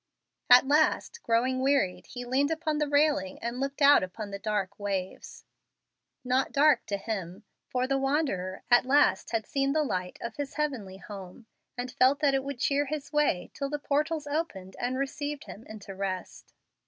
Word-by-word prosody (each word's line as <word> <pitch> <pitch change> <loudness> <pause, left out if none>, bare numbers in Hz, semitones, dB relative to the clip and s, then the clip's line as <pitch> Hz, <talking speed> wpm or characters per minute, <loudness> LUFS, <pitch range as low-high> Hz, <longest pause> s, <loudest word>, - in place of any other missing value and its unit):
At 250 +2 +8
last, 310 +10 +2
growing 250 +3 +1
wearied, 260 -10 +1
he 245 -1 -7
leaned 270 +4 +1
upon 320 -2 -1
the 300 - +1
railing 285 -10 +2
and 235 +2 -4
looked 275 +2 -2
out 285 +1 +8
upon 200 +3 -6
the 200 - -5
dark 205 -2 -2
waves 195 -2 -4 0.8
not 255 +1 +1
dark 295 +1 +4
to 200 - -1
him, 195 -2 -5 0.3
for 250 0 0
the 270 +1 0
wanderer 270 - -1
at 245 +1 +6
last 280 -8 +3
had 225 -2 -1
seen 275 0 0
the 310 0 +2
light 185 -9 -3
of 235 -1 -6
his 285 -2 -4
heavenly 255 -11 -3
home, 195 +2 -10 0.3
and 250 +1 -4
felt 260 +3 +3
that 285 -2 +3
it 270 0 +1
would 280 -1 -5
cheer 285 +2 +1
his 300 0 -5
way 295 -12 +1
till 275 -1 -3
the 295 - -2
portals 295 +2 -1
opened 285 - -4
and 250 +1 -1
received 285 +2 -3
him 220 - -11
into 210 -2 -9
rest. 190 -1 -5
260 Hz, 180 wpm, -28 LUFS, 200-285 Hz, 0.8 s, At